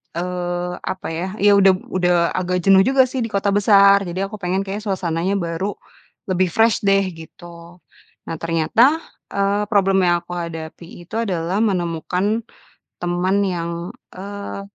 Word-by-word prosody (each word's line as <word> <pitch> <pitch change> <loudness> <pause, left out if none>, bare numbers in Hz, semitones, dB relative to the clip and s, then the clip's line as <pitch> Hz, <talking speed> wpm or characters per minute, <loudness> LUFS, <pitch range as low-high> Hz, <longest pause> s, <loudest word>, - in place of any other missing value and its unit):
eee, 175 0 -3
apa 185 - -5
ya, 165 +2 -3 0.2
ya 205 - +6
udah 190 -1 +6 0.2
udah 180 -1 +2 0.2
agak 180 -1 -2
jenuh 195 +1 +6
juga 265 -1 +5
sih 255 +1 -3
di 230 - -1
kota 200 -2 0
besar. 200 -1 +5
Jadi, 185 +3 -3
aku 205 +1 -6
pengen, 185 +1 -1
kayaknya 205 +2 -6
suasananya 185 0 -1
baru, 185 +2 -3 0.5
lebih 185 0 +2
fresh 225 0 +3
deh, 195 0 +4 0.2
gitu. 170 +1 -13 0.5
Nah 165 - -3
ternyata, 220 - +2 0.3
eee, 200 +1 +1
problem 195 -2 +3
yang 175 0 +3
aku 175 - -14
hadapi 165 0 -7 0.2
itu 195 +6 -10
adalah 185 -4 -1
menemukan 190 +2 -1 0.6
teman 175 +2 0
yang, 170 -2 -3 0.3
eee, 200 +1 -7
185 Hz, 145 wpm, -20 LUFS, 175-200 Hz, 0.6 s, ya